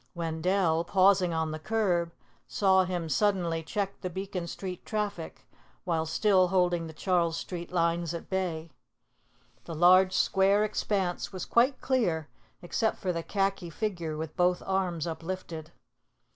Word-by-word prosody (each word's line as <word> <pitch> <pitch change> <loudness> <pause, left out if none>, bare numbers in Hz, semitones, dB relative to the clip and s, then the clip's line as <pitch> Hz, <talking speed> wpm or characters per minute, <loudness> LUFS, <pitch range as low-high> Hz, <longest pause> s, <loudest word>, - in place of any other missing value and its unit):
Wendell, 165 +1 0
pausing 190 -1 +3
on 160 -1 -1
the 155 - -5
curb, 175 -4 0 0.4
saw 190 -2 +3
him 175 -2 -3
suddenly 170 0 +1
check 195 +4 -4
the 185 - -3
Beacon 190 -1 -5
Street 180 +1 -6
traffic, 205 -6 -4 0.4
while 165 -3 -1
still 185 +2 +3
holding 175 -2 +1
the - - -8
Charles 170 -1 0
Street 175 -2 -6
lines 170 -1 0
at 170 - -7
bay. 170 -4 -3 0.9
The 165 - -6
large 185 +3 +6
square 195 +2 +3
expanse 195 -4 -1
was 185 -2 -5
quite 250 +3 +2
clear 175 - 0 0.3
except 220 +5 0
for 185 -3 -2
the 165 - -2
khaki 195 -1 -1
figure 170 -4 -3
with 160 0 -5
both 180 -1 +2
arms 185 -4 -1
uplifted. 165 -1 -6
180 Hz, 140 wpm, -29 LUFS, 165-195 Hz, 0.9 s, large